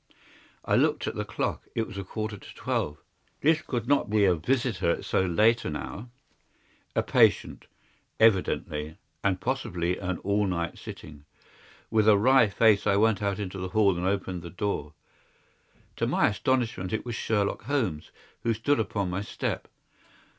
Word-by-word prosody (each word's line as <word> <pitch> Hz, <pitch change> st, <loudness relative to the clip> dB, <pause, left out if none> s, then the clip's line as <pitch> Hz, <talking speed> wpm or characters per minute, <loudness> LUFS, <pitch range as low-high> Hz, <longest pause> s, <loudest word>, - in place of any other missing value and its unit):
I -, -, +2 dB
looked -, -, +2 dB
at -, -, -2 dB
the -, -, -3 dB
clock. -, -, -3 dB
It 115 Hz, -, 0 dB
was 110 Hz, -, -10 dB
a -, -, -4 dB
quarter 110 Hz, +2 st, -4 dB
to 100 Hz, -, -13 dB
twelve. 75 Hz, 0 st, -2 dB, 0.4 s
This 155 Hz, +2 st, +3 dB
could 120 Hz, -3 st, -4 dB
not 140 Hz, -6 st, +2 dB
be 105 Hz, -1 st, +3 dB
a 95 Hz, -, +5 dB
visitor 115 Hz, +1 st, 0 dB
at -, -, -1 dB
so -, -, +1 dB
late 110 Hz, +6 st, +3 dB
an 75 Hz, -, -3 dB
hour. 110 Hz, +9 st, -6 dB, 0.9 s
A -, -, +2 dB
patient, -, -, +2 dB, 0.5 s
evidently, 80 Hz, -7 st, +1 dB, 0.3 s
and 95 Hz, -2 st, +1 dB
possibly 90 Hz, -7 st, -2 dB
an 95 Hz, -2 st, -2 dB
all 100 Hz, +1 st, +1 dB
night 85 Hz, -2 st, -3 dB
sitting. 75 Hz, -1 st, -10 dB, 0.7 s
With 110 Hz, -1 st, +3 dB
a 105 Hz, -, +7 dB
wry 125 Hz, +2 st, +5 dB
face 105 Hz, 0 st, +3 dB
I 100 Hz, -, +4 dB
went 110 Hz, 0 st, +3 dB
out 100 Hz, -1 st, 0 dB
into 95 Hz, -2 st, -5 dB
the 90 Hz, 0 st, -4 dB
hall 100 Hz, -2 st, +3 dB
and 90 Hz, +1 st, -1 dB
opened 95 Hz, -2 st, -2 dB
the 85 Hz, -, -8 dB
door. 80 Hz, -5 st, -3 dB, 1.0 s
To -, -, 0 dB
my -, -, +3 dB
astonishment 110 Hz, -4 st, -1 dB
it 110 Hz, -, -2 dB
was 120 Hz, -, -4 dB
Sherlock 105 Hz, -3 st, -1 dB
Holmes 115 Hz, -, -1 dB, 0.3 s
who 115 Hz, -1 st, 0 dB
stood 145 Hz, +6 st, +1 dB
upon 100 Hz, -3 st, -1 dB
my 95 Hz, +2 st, -2 dB
step. 105 Hz, -, -4 dB
100 Hz, 170 wpm, -27 LUFS, 90-110 Hz, 1.0 s, a